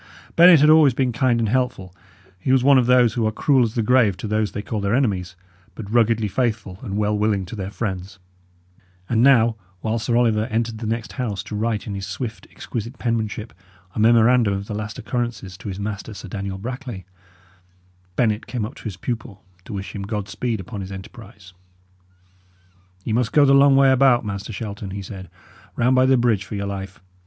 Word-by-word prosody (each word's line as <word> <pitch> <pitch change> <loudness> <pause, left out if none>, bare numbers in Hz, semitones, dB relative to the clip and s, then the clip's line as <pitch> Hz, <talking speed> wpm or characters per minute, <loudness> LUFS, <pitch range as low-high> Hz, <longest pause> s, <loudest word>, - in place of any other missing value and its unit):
Bennet 170 -3 +8
had 150 - +6
always 155 -5 +6
been 130 -1 +1
kind 120 0 +1
and 115 - +1
helpful; 105 -6 -1 0.5
he 130 - -1
was 130 -1 +4
one 140 -1 +6
of 120 - +1
those 125 -2 +4
who 115 -3 0
are - - 0
cruel 135 +4 +2
as 115 -1 -2
the 115 - +1
grave 110 -5 +3
to - - -5
those 105 0 0
they 105 - -5
call 105 0 -3
their 100 +3 +1
enemies, 95 -9 -1 0.4
but 110 - -7
ruggedly 115 -2 +3
faithful 105 -4 -2
and 100 0 -4
well 105 0 +1
willing 105 -2 0
to 95 - -8
their 95 -2 -5
friends; 100 -3 -5 0.9
and 115 -1 +1
now, 120 -4 +5 0.2
while 110 +1 -1
Sir 115 +2 0
Oliver 110 -3 +2
entered 115 0 -2
the 110 - -4
next 115 0 -3
house 110 -7 -3
to 105 - -7
write, 110 0 -1
in 105 - -5
his 95 -1 -5
swift, 110 +2 -6
exquisite 115 +2 -6
penmanship, 115 -2 -3 0.4
a - - -5
memorandum 115 -1 +4
of 100 +1 -5
the 105 - -6
last 105 0 -5
occurrences 115 -5 -4
to - - -9
his 95 0 -6
master, 105 +1 -5
Sir 100 - -9
Daniel 95 -1 -4
Brackley, 120 -3 -6 1.1
Bennet 110 -2 0
came 115 -2 -3
up 110 - -7
to - - -14
his 100 -5 -5
pupil 110 -3 -5 0.2
to 110 - -8
wish 100 0 -6
him 100 - -5
God 105 0 -4
speed 115 -3 -3
upon 100 +2 -7
his 95 0 -7
enterprise. 95 0 -11 1.5
"Ye 110 - -1
must 120 0 0
go 145 -1 +6
the 135 - +5
long 140 0 +6
way 135 0 +5
about, 130 -2 +4
Master 100 +1 -5
Shelton," 100 -1 -6
he 100 +1 -6
said; 95 -1 -9 0.5
"round 125 +2 +2
by 130 0 +4
the 130 0 +4
bridge, 115 -5 +2
for 100 - -7
your 100 0 -3
life! 95 -1 -6
110 Hz, 205 wpm, -22 LUFS, 100-120 Hz, 1.5 s, Bennet